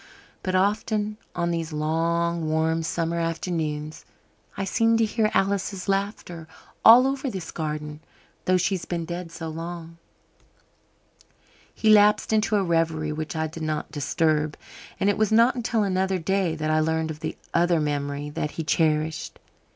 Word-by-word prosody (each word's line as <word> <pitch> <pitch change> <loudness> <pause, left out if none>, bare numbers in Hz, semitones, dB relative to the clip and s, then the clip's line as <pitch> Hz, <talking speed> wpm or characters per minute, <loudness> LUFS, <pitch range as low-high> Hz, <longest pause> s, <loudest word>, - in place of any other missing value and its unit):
But 185 -1 -2
often, 210 +2 0 0.2
on 170 -1 0
these 165 -1 -3
long 165 +2 0
warm 160 +1 +1
summer 165 +1 -2
afternoons, 160 -2 -3 0.5
I 195 - -1
seem 225 +4 +2
to 225 - +3
hear 215 0 +1
Alice's 195 -1 0
laughter 195 -4 -2 0.4
all 240 +3 +9
over 270 0 -1
this 190 -7 -6
garden; 150 -1 -4 0.5
though 185 0 +4
she's 185 0 0
been 170 -2 -3
dead 175 0 -6
so 165 0 -6
long." 165 +1 -7 1.7
He 215 - +2
lapsed 210 +1 +5
into 215 0 +2
a 200 - +2
reverie 165 -3 0
which 155 +1 -5
I 160 0 0
did 160 +1 -7
not 155 -1 -3
disturb, 155 +1 0 0.4
and 195 - +1
it 205 0 +2
was 215 -1 +2
not 230 +3 +5
until 235 -3 0
another 190 -1 0
day 185 -1 0
that 155 -1 -1
I 155 - +3
learned 160 0 0
of 155 - -8
the - - -5 0.2
other 175 -1 +3
memory 145 -1 -2
that 150 - -2
he 165 - -1
cherished. 155 0 0
170 Hz, 155 wpm, -25 LUFS, 155-195 Hz, 1.7 s, all